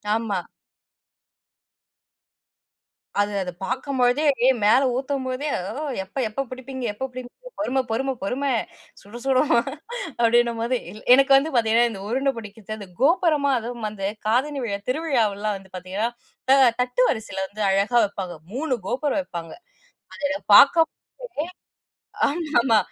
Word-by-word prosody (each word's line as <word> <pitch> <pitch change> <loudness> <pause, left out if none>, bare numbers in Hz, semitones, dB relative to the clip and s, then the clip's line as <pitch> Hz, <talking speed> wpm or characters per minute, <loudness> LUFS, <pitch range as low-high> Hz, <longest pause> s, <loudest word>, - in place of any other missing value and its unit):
ஆமா. 220 -4 -1 2.8
அது 205 0 +2
அது 180 - -5
பாக்கும் 260 +4 -3
பொழுதே, 250 +5 +3 0.2
ஏ, - - +7
மேலே 240 +6 +5
ஊத்தும் 265 +1 -2
போதே, 255 +4 -3 0.2
"ஓ, 300 - -5 0.2
எப்ப 190 +7 -13
எப்பப் 260 +4 -4
புடிப்பீங்க? 260 0 -7
எப்பப் 265 +5 -5
புடிப்பீங்க? 255 - -10
பொறும 270 -3 +1
பொறும, 265 +4 0
பொறும. 265 +8 -1 0.5
சுடச் 235 +5 -11
சுடும்," 270 +2 +3 0.7
அப்டின்னும் 235 0 +3
போது, 245 +2 0 0.4
எனக்கு 275 +1 +5
வந்து 290 +3 -1
பாத்தீங்கன்னா, 235 +1 +4
இந்த 195 -3 -8
உருண்ட 270 +3 +1
புடிக்கிறத்து, 215 0 -8
அது 200 - -9
கோபுரமா 300 -2 +3
அதுவும் 235 0 -6
வந்து 210 -2 -7
அந்தக் 210 +2 -5
காதணி 270 +6 +1
விழா, 200 -4 -2
திருவிழாவெல்லாம் 225 -9 0
வந்து 190 -1 -17
பாத்தீங்கன்னா, 190 +5 -2 0.4
அ, - - +8 0.3
தட்டு 250 0 0
வரிசைல 195 -5 -2
வந்து 215 +2 -8
அழகா 200 +5 +2
வப்பாங்க. 190 -3 -6 0.2
3 270 +2 -1
கோபுரம் 285 +5 0
வெப்பாங்க. 170 -10 -7 0.6
அது - - -12
என்ன 290 0 -2 0.2
பாக்கும் 320 +6 +7 0.3
போதே. 405 -11 -4 0.8
ஆமா 320 +2 -2
ஆமா, 235 -2 +4
245 Hz, 140 wpm, -23 LUFS, 215-275 Hz, 2.8 s, அ